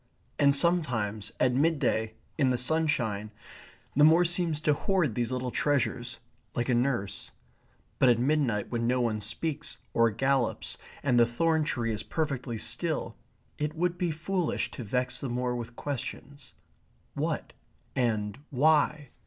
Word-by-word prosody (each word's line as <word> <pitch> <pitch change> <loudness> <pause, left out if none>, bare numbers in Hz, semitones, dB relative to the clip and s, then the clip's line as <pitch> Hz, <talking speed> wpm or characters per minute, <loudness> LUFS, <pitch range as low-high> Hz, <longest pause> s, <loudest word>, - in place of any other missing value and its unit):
And 140 -1 +5
sometimes 120 - +2
at 125 -1 +3
midday, 130 -7 +1 0.2
in 135 -5 +2
the 125 - +1
sunshine, 125 -7 +1 0.7
the 145 - +5
moor 165 +3 +6
seems 170 -3 +1
to 150 - +3
hoard 170 - +1
these 120 +2 -1
little 125 -1 -2
treasures, 130 -3 0 0.4
like 120 +1 -1
a - - +3
nurse. 120 -5 -1 0.7
But 130 - +6
at 120 - +5
midnight 125 -5 +1
when 115 -1 0
no 125 +1 +2
one 110 -3 0
speaks 150 +8 -3 0.2
or 115 0 +4
gallops, 130 +2 0 0.2
and 130 -4 +3
the 120 - +6
thorn 160 +6 +1
tree 115 -5 -1
is 105 - -2
perfectly 135 -7 -3
still, 120 +3 -1 0.4
it 150 +1 -2
would 175 +1 0
be 175 - +1
foolish 170 +2 -1
to 125 - -7
vex 125 +4 -1
the 135 - -3
moor 125 +1 -1
with 120 0 -6
questions 140 0 -6 0.6
what? - - -3 0.4
and 110 -4 0
why? 150 0 +2
130 Hz, 145 wpm, -29 LUFS, 120-155 Hz, 0.7 s, moor